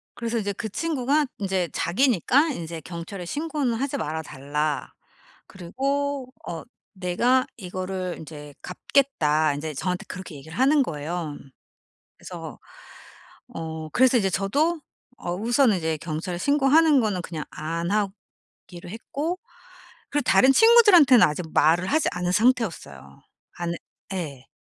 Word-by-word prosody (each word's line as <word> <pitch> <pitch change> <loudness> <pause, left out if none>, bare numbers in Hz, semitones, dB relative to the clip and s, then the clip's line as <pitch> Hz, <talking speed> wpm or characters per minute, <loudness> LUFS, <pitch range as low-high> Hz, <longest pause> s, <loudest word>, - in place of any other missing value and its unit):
그래서 235 0 -2
이제 205 -2 -1
그 220 +3 -5
친구가 295 +2 0
인제 190 -3 -1
"자기니까 260 - +2
이제 165 -3 -6
경찰에 175 +3 -7
신고는 290 - -2
하지 275 +4 -2
말아 160 - -3
달라." 145 +1 -3 0.6
그리고 270 +7 -3 0.2
어 165 -2 -5 0.3
"내가 220 +8 +2
이거를 185 -2 -4
인제 150 -2 -10
갚겠다." 155 - +1
인제 155 +1 -5
저한테 180 +5 -3
그렇게 185 -3 -8
얘기를 160 +5 -10
하는 275 +2 +4
거예요. 155 -2 -4 0.8
그래서 - - -8 0.9
어 160 -1 -6
그래서 260 0 +4
이제 195 -5 +2
저도 290 - +1 0.4
어 175 0 -3
우선은 235 +2 +3
이제 160 -1 -1
경찰에 165 +3 -4
신고하는 290 - +4
거는 205 -6 -1
그냥 160 -4 -5
안 165 +3 -3
하기로 195 -3 -5
했고 285 - -4 0.7
그리고 290 - 0
다른 265 +1 +5
친구들한테는 360 - +7
아직 155 +3 -3
말을 165 +4 +3
하지 310 +6 +2
않은 180 0 -1
상태였어요. 190 - 0 0.4
안 170 -1 -2 0.4
예. 145 -8 -5
190 Hz, 290 characters per minute, -25 LUFS, 165-265 Hz, 0.9 s, 친구들한테는